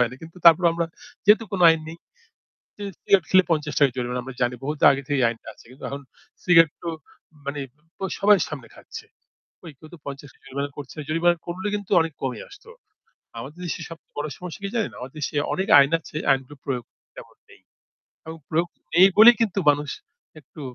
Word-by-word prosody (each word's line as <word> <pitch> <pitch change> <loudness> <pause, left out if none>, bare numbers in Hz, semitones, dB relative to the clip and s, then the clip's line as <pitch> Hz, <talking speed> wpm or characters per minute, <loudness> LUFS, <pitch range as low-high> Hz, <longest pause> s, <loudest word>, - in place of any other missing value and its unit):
হয় 125 - +3
না। - - -9
কিন্তু 165 +2 -12
তারপরও 170 +1 +7
আমরা 170 0 -1 0.4
যেহেতু 220 +2 +6
কোনো 180 -2 +2
আইন 160 -1 +1
নেই 165 +1 -9 1.0
সিগারেট 190 -4 +3
খেলে 185 -1 +6
৳৫০ 150 -4 +1
জরিমানা 125 0 -3
আমরা 135 -1 -8
জানি 125 0 +1
বহুতো 150 +1 -4
আগে 135 0 -3
থেকেই 140 -2 0
এই - - +5
আইনটা 115 -1 -7
আছে। - - -20
কিন্তু 130 - -13
এখন 140 0 -6 0.4
সিগারেট 165 -4 +6
তো 170 - -4 0.6
মানে 140 0 -3 0.4
প - - -44 0.2
সবাই 205 -1 +6
সামনে 135 -7 -8
খাচ্ছে। - - -10 0.7
কেউ 155 - -14
তো - - -13
৳৫০ 140 -1 -10
জরিমানা 140 +1 -4
করছে। 140 +1 -9
জরিমানা 170 +2 +2
করলে 185 +3 -5
কিন্তু 205 -2 -5
অনেক 160 -1 -1
কমে 130 -2 -3
আসত। 410 - -16 0.8
আমাদের 150 +6 -10
দেশে 170 0 -4
সবচেয়ে 165 0 -13
বড় 150 +1 -2
সমস্যা 180 -1 -8
কি 200 - -2
জানেন? 225 -3 -1
আমাদের 125 +3 -9
দেশে 150 - -4 0.2
অনেক 190 +1 -2
আইন 140 +2 +4
আছে, 155 - -15 0.2
আইনগুলো 135 +2 -2
প্রয়োগ 125 -3 -3 0.3
তেমন - - -13
নেই। - - -19 0.6
এবং 160 0 -8
প্রয়োগ 170 +2 +1 0.3
নেই 185 +2 +8
বলেই 235 +3 +9
কিন্তু 205 -3 0
মানুষ 145 0 +1 0.5
একটু 150 +3 -14
155 Hz, 185 wpm, -23 LUFS, 140-175 Hz, 1.0 s, বলেই